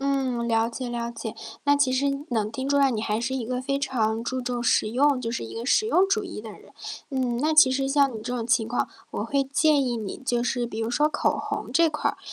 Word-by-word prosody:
嗯， 265 -4 0
了 225 0 +2
解 245 +1 -5
了 235 0 -3
解。 225 -1 -6 0.3
那 285 0 +5
其 285 -2 +2
实 260 +2 +1 0.2
能 220 -4 -1
听 260 +4 -4
出 285 - +2
来 275 -1 +4
你 225 -4 -2
还 215 -1 -1
是 240 +3 -2
一 245 -4 -3
个 255 0 -2
非 275 +1 -1
常 225 -5 0
注 255 +2 -3
重 245 -1 -2
实 220 -2 +2
用， 275 +3 +3
就 230 -2 -3
是 235 - -3
一 115 - -7
个 230 - -5
实 430 +10 +3
用 385 -4 +4
主 390 +2 +1
义 340 - -7
的 220 - -8
人。 - - -16 0.4
嗯， 255 -3 -1
那 305 +4 +1
其 305 -4 +7
实 270 +1 0
像 275 -1 +3
你 - - -4
这 245 +2 -3
种 230 -2 -3
情 230 -1 +2
况， 245 - -1 0.2
我 - - -3
会 280 -2 +1
建 285 +1 +3
议 245 -2 -1
你 215 -4 -5
就 245 -3 -1
是 245 -1 -1
比 225 -1 -5
如 225 - -1
说 295 +5 +3
口 - - 0
红 - - -4
这 335 -1 +4
块 300 - -1
儿， - - -14
255 Hz, 280 characters per minute, -25 LUFS, 235-275 Hz, 0.4 s, 其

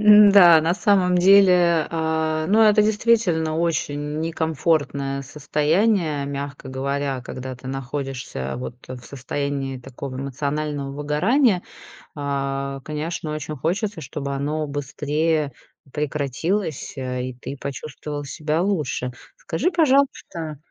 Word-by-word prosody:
М-да, 205 -6 +8
на 165 +3 +1
самом 190 -4 +3
деле, 180 -4 +5
э, 160 -1 0
ну, 215 +3 +4
это 210 -1 +6
действительно 210 -7 +2
очень 150 -3 -1
некомфортное 155 -4 0
состояние, 150 +3 +1
мягко 140 -1 -5
говоря, 135 0 -2
когда 130 +1 -7
ты 125 - -12
находишься 135 - -4
вот 125 -1 -6
в 130 -1 -7
состоянии 140 +1 -3
такого 130 +1 -8
эмоционального 140 +1 -3
выгорания. 180 - +2 0.5
А, 140 -1 -2
конечно, 155 0 -4
очень 150 0 -5
хочется, 185 - -2
чтобы 140 0 -4
оно 150 +3 -2
быстрее 150 +2 -1 0.4
прекратилось, 150 - -2
э, 125 -1 -3
и 130 - -5
ты 135 +3 -7
почувствовал 145 +1 -5
себя 155 +3 -1
лучше. 150 -10 -1 0.3
Скажи, 195 - -1
пожалуйста, 275 - +1
150 Hz, 110 wpm, -23 LUFS, 140-170 Hz, 0.5 s, М-да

